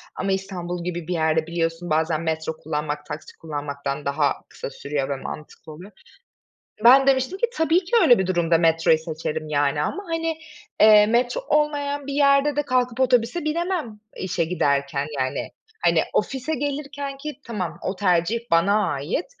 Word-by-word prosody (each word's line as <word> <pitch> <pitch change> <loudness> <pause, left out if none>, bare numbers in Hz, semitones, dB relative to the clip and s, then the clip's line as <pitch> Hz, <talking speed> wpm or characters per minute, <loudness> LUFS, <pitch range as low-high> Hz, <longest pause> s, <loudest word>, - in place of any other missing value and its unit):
ama 195 +1 -2
İstanbul 180 -2 -3
gibi 175 -2 -4
bir 180 - -1
yerde 160 -1 +1
biliyorsun, 170 0 -2
bazen 160 +1 +1
metro 160 -1 -2
kullanmak, 150 -1 -4
taksi 150 0 -8
kullanmaktan 145 -2 -5
daha 140 +1 +1 0.2
kısa - - -7
sürüyor 140 -1 -3
ve 140 - -1
mantıklı 150 +3 -9
oluyor." 180 +7 -12 0.9
Ben 270 +3 +8
demiştim 270 +7 +2
ki, 475 - +2
"Tabii 325 +3 +2
ki 350 - -13
öyle 245 - +6
bir 190 - 0
durumda 170 -2 +2
metroyu 165 -1 +3
seçerim, 155 -1 -5
yani, 145 0 +1
ama, 400 - -3
hani, 330 -1 -2 0.4
eee, 210 -1 +8
metro 245 - +1
olmayan 290 -2 0
bir 280 - -4
yerde 280 0 +3
de 295 - +2
kalkıp 255 -3 0
otobüse 255 +5 +2
binemem 310 - -2 0.2
işe 185 -2 -1
giderken 140 -4 0
yani. 130 0 -2 0.4
Hani, - - +4
ofise 270 +4 -1
gelirkenki 285 +1 -5
tamam, 185 -8 -4
o 190 - -3
tercih 185 +3 +1
bana 200 +6 +3
ait 145 - -2
185 Hz, 155 wpm, -23 LUFS, -, 0.9 s, Ben